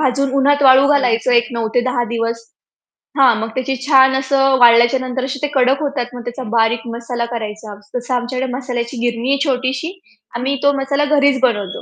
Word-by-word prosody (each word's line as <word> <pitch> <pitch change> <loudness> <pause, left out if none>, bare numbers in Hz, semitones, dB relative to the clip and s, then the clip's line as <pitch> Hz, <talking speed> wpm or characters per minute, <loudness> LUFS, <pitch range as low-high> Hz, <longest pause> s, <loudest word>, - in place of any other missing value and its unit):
भाजून 275 -1 0
उन्हात 285 +1 +2
वाळू 265 +1 +6
घालायचं 250 -3 +1
एक 235 - -1
9 225 -1 -2
ते 245 - +3
10 245 -1 -1
दिवस. 230 0 -2 0.8
हां, 250 -4 +5
मग 225 - -4
त्याची 260 +1 -2
छान 265 -2 +4
असं 270 0 +1
वाळल्याच्या 235 +2 +5
नंतर 255 0 -3
असे 275 0 -5
ते - - +1
कडक 265 +2 +2
होतात, 250 -4 -4
मग 245 - -7
त्याचा 245 +2 -6
बारीक 225 0 +1
मसाला 235 0 -4
करायचा. 215 -1 -7 0.2
तसं 245 +1 -3
आमच्याकडे 250 +1 -3
मसाल्याची 250 -2 -5
गिरणी 235 +2 -3
आहे 280 - +1
छोटीशी, 265 +6 -2 0.4
आम्ही 265 +3 -2
तो 285 - +4
मसाला 280 +2 0
घरीच 280 -2 +2
बनवतो. 205 -5 -4
255 Hz, 185 wpm, -17 LUFS, 235-270 Hz, 0.8 s, वाळू